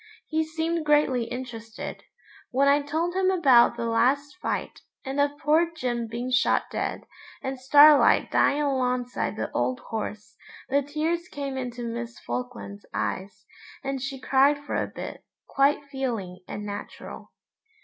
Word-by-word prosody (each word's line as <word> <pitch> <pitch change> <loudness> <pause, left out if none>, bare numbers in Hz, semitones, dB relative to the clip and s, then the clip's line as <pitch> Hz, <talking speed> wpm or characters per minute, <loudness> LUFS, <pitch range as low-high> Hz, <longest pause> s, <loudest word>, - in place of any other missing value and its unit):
He 315 0 0
seemed 320 +1 -2
greatly 295 -5 +3
interested. 230 -3 -7 0.5
When 275 +2 +2
I 285 +1 +5
told 320 +5 -1
him 375 0 +2
about 265 -11 +5
the 235 - -2
last 260 +7 +1
fight, - - -3 0.2
and 270 +2 0
of 285 0 0
poor 315 +3 +2
Jim 240 -6 -2
being 240 +3 -4
shot 265 +1 +3
dead, - - -2 0.4
and 265 0 -3
Starlight 290 +3 +6
dying 290 +1 +3
alongside 250 -3 -1
the - - -4
old 255 -1 0
horse, 210 -2 -6 0.3
the 280 +2 +3
tears 315 +5 -2
came 280 -4 -5
into 245 -2 -4
Miss 235 +1 -5
Falkland's 245 -5 -6
eyes, 195 +1 -4 0.4
and 270 -1 -3
she 275 0 -4
cried 275 +2 +4
for 290 0 -7
a - - 0
bit, - - -8 0.2
quite 280 +1 +2
feeling 240 -10 -4
and 210 0 -6
natural. 205 0 -8
265 Hz, 145 wpm, -26 LUFS, 240-290 Hz, 0.5 s, Starlight